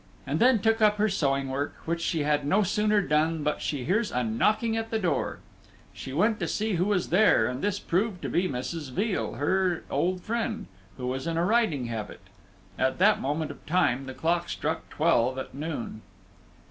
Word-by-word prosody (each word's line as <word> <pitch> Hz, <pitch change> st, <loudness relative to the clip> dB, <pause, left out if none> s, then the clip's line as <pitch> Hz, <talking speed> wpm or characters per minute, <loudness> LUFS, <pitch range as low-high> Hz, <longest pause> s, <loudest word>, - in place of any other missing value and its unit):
And 150 Hz, +3 st, -1 dB
then 255 Hz, 0 st, +5 dB
took 225 Hz, +1 st, +2 dB
up 210 Hz, -1 st, +5 dB
her 210 Hz, +1 st, +2 dB
sewing 140 Hz, -7 st, 0 dB
work, 140 Hz, +2 st, -3 dB
which 170 Hz, +1 st, -1 dB
she 165 Hz, -2 st, 0 dB
had 145 Hz, 0 st, +1 dB
no 190 Hz, +9 st, +3 dB
sooner 210 Hz, +2 st, +2 dB
done 155 Hz, -1 st, +1 dB
but 150 Hz, -, -1 dB
she 140 Hz, -4 st, -2 dB
hears 205 Hz, -, 0 dB
a 125 Hz, -, 0 dB
knocking 215 Hz, -, +1 dB
at 225 Hz, 0 st, -2 dB
the 225 Hz, -, 0 dB
door; 175 Hz, -10 st, -1 dB, 0.6 s
she 130 Hz, -, -8 dB
went 210 Hz, -, +2 dB
to 175 Hz, -, -1 dB
see 215 Hz, +5 st, -1 dB
who 180 Hz, +1 st, +1 dB
was 200 Hz, -3 st, 0 dB
there, 185 Hz, -, +5 dB
and 125 Hz, +4 st, -3 dB
this 205 Hz, -1 st, 0 dB
proved 190 Hz, 0 st, -1 dB
to -, -, -1 dB
be 180 Hz, +1 st, +1 dB
Mrs. 140 Hz, +3 st, -4 dB
Veal, 195 Hz, -, -1 dB
her 180 Hz, +6 st, 0 dB
old 180 Hz, +1 st, 0 dB
friend, 230 Hz, -1 st, -2 dB, 0.3 s
who 125 Hz, -, -5 dB
was 130 Hz, +4 st, -3 dB
in 165 Hz, -1 st, -1 dB
a 170 Hz, -, +2 dB
riding 210 Hz, -, +2 dB
habit. 110 Hz, -3 st, -5 dB, 0.6 s
At 130 Hz, 0 st, +1 dB
that 205 Hz, +4 st, +4 dB
moment 150 Hz, +2 st, -2 dB
of -, -, -13 dB
time 140 Hz, -6 st, +1 dB
the 130 Hz, -, -7 dB
clock 170 Hz, +1 st, 0 dB
struck 160 Hz, +2 st, -3 dB
twelve 130 Hz, -6 st, +2 dB
at 130 Hz, -, -6 dB
noon. 140 Hz, -6 st, -5 dB
170 Hz, 200 wpm, -27 LUFS, 140-205 Hz, 0.6 s, then